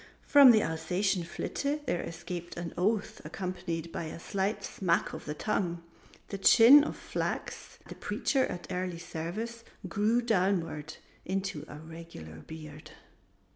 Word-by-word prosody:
From 285 -2 +8
the 220 -3 +6
Alsatian 180 +3 0
Flitte 285 - -3
there 175 - 0
escaped 175 +1 -6
an 170 -1 -5
oath 205 +3 0
accompanied 175 -3 -4
by 165 - -4
a 155 - -7
slight 195 +4 -2
smack 175 -3 0
of - - -7
the 150 - -4
tongue. 175 -2 -1 0.5
The 200 - -5
chin 245 +8 +9
of - - -4
Flachs, - - -4
the - - -7
Preacher 270 -3 0
at 175 - -6
Early 180 -1 -2
Service, 205 +8 -5 0.2
grew 215 +7 +2
downward 180 -8 0 0.3
into 190 -5 -3
a - - -9
regular 160 - -10
beard. 155 - -10
180 Hz, 135 wpm, -30 LUFS, 165-210 Hz, 0.5 s, chin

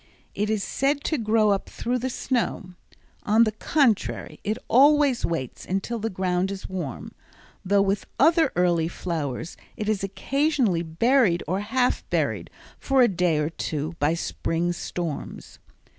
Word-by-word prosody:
It 210 +1 -1
is 215 -2 0
said 280 +1 0
to 310 - -1
grow 215 -1 +3
up 195 - -1
through 250 +1 -2
the 260 +2 -2
snow; 235 -7 -2 0.5
on 220 +2 +4
the 215 - +1
contrary, 230 0 0
it 215 +2 -1
always 285 0 +4
waits 150 -7 -4
until 195 +5 -2
the 225 +1 -2
ground 185 -1 -1
is 195 -1 -6
warm, 175 -10 -5 0.5
though 200 +1 +3
with 200 +1 -1
other 320 +1 +4
early 175 -2 +2
flowers 160 -3 -4 0.2
it 210 - -3
is 215 -3 0
occasionally 240 - 0
buried 180 +3 +2
or 185 +4 0
half 245 +5 0
buried - - -1 0.3
for 270 -2 +3
a - - +6
day 180 -5 +1
or 150 +1 -1
two 155 0 -4
by 150 +3 +2
spring 170 0 -2
storms. 170 -2 -6
200 Hz, 150 wpm, -25 LUFS, 175-245 Hz, 0.5 s, a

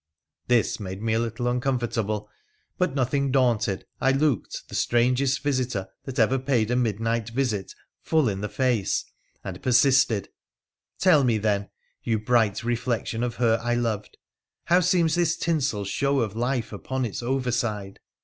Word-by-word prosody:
' - - -63
This 120 -2 +2
made 95 -2 -6
me 110 +1 -1
a 110 - +2
little 115 +1 -2
uncomfortable, 120 -5 -1 0.5
but, 180 -7 +1
nothing 135 +1 0
daunted, 120 -7 +1
I 135 - +3
looked 135 -3 -1
the - - -14
strangest 125 +3 +1
visitor 130 -8 -1 0.2
that 135 -2 -6
ever 125 +4 +3
paid 125 -4 +1
a - - +2
midnight 115 -1 0
visit 115 -5 -2 0.3
full 160 -5 +2
in 100 -2 -2
the 105 - -3
face, 115 -2 0 0.4
and - - -7
persisted, 130 -4 +3 0.4
' - - -56
Tell 165 -7 +6
me, 120 -3 +2
then, 100 -1 0 0.3
you 115 -2 0
bright 110 -1 +1
reflection 120 -1 -1
of 120 -1 -2
her 115 -2 +2
I 120 0 +1
loved, 115 -4 -2 0.5
how 175 +1 +4
seems 175 -2 +2
this 170 -2 +1
tinsel 140 - 0
show 140 +6 +1
of 110 -3 -2
life 120 -1 -1
upon 130 +5 -3
its 110 - -4
over 125 +1 -1
side 105 -5 -2
120 Hz, 160 wpm, -25 LUFS, 110-135 Hz, 0.5 s, Tell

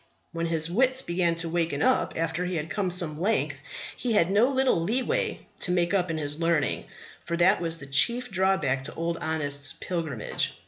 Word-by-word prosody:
When 165 0 -2
his 165 0 -1
wits 260 +5 +2
began 170 -1 +1
to 165 0 -4
waken 165 -3 0
up - - +2
after 165 +2 -1
he 180 0 -2
had 160 -1 -3
come 190 +4 0
some 170 -3 -1
length 215 +5 0 0.3
he 245 -2 -1
had 185 -3 +3
no 215 +6 +4
little 265 -9 +2
leeway 235 +9 0 0.2
to 180 - +1
make 175 0 +1
up 185 -3 +1
in 165 - -1
his 145 0 -3
learning; 165 -4 +1 0.4
but 170 0 -1
that 180 +2 +4
was 165 -1 -2
the 140 - -9
chief 235 - +3
drawback 185 -9 +1
to - - -4
Old 165 +1 -2
Honest's 145 -3 -1
pilgrimage. 160 -10 -2
170 Hz, 190 wpm, -27 LUFS, 160-190 Hz, 0.4 s, no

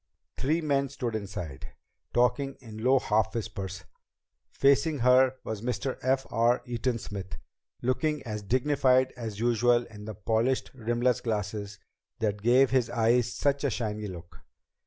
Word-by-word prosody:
Three 155 +6 0
men 140 -3 +1
stood 125 -4 -4
inside, 100 -9 -6 0.4
talking 135 +3 +1
in 110 -3 -9
low 130 +2 +5
half 110 -3 +1
whispers. 95 -4 -5 0.7
Facing 140 +3 +3
her 125 +1 +5
was 110 -2 -5
Mr. 125 +2 -2
F. 130 +1 +1
R. 120 +2 +2
Eaton 120 0 -1
Smith, 100 -3 -7 0.5
looking 150 +4 0
as 105 -3 -4
dignified 130 +3 +2
as 110 -4 -6
usual 120 +1 +3
in 105 -2 -11
the 110 -1 -6
polished 115 +6 0
rimless 120 0 0
glasses 105 -2 -3 0.4
that 105 -2 -1
gave 125 +4 +4
his 130 -3 +2
eyes 120 +1 +2
such 140 0 0
a 140 - +2
shiny 105 -3 -3
look. 85 -3 -10
120 Hz, 140 wpm, -28 LUFS, 110-130 Hz, 0.7 s, low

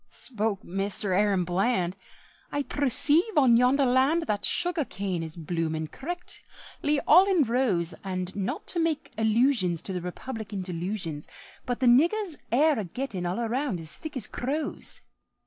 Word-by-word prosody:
Spoke 220 -5 -2
Mister 195 +1 +1
Aaron 195 -1 +2
Bland, 180 0 0 0.6
"I 285 0 -1
perceive 295 - +3
on 260 -5 +5
yonder 255 +4 +3
land 265 +7 +2
That 210 -8 -1
sugar 350 -3 +2
cane 195 -7 -4
is 160 0 -4
bloomin', 160 -1 -3
correctly, 300 - -4
all 370 +3 +5
in 360 -6 +3
rows, 220 -9 0
And 185 -1 -4
not 195 -2 -3
to 345 - +6
make 325 -1 -1
allusions 220 - +2
To 185 -2 -3
Republican 205 +2 -6
delusions, 175 -3 -4 0.4
But 245 +1 -3
the - - +2
niggers 335 - +3
air 295 +2 +3
a - - -2
gettin' 190 -2 -4
all 180 +5 -3
around 240 -3 -2
as 160 -1 +4
thick 315 -4 -6
as 230 - 0
crows." 285 +7 -4
225 Hz, 145 wpm, -26 LUFS, 185-285 Hz, 0.6 s, to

